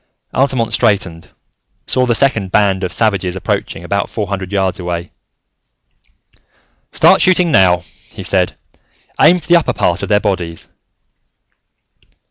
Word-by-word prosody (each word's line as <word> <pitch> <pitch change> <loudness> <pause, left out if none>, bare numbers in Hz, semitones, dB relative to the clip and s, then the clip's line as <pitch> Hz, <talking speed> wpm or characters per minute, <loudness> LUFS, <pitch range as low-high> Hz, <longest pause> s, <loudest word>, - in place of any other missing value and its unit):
Altamont 130 -4 0
straightened, 95 -8 0 0.6
saw 130 0 0
the 120 - +2
second 110 -9 +1
band 100 -2 +1
of 90 - -2
savages 95 -5 0
approaching 85 -2 -3
about 100 +3 -2
four 105 - -3
hundred 95 -1 -5
yards 95 -2 -1
away. 85 -1 -5 1.8
"Start - - +4
shooting 180 -2 +3
now," 90 - +3 0.3
he - - -9
said. - - +1 0.7
"Aim 180 - +6
for 170 - -9
the 175 0 +5
upper 170 - -1
part 85 +2 0
of 100 - -5
their 105 - +3
bodies." 90 -6 -4
100 Hz, 130 wpm, -15 LUFS, 90-115 Hz, 1.8 s, Aim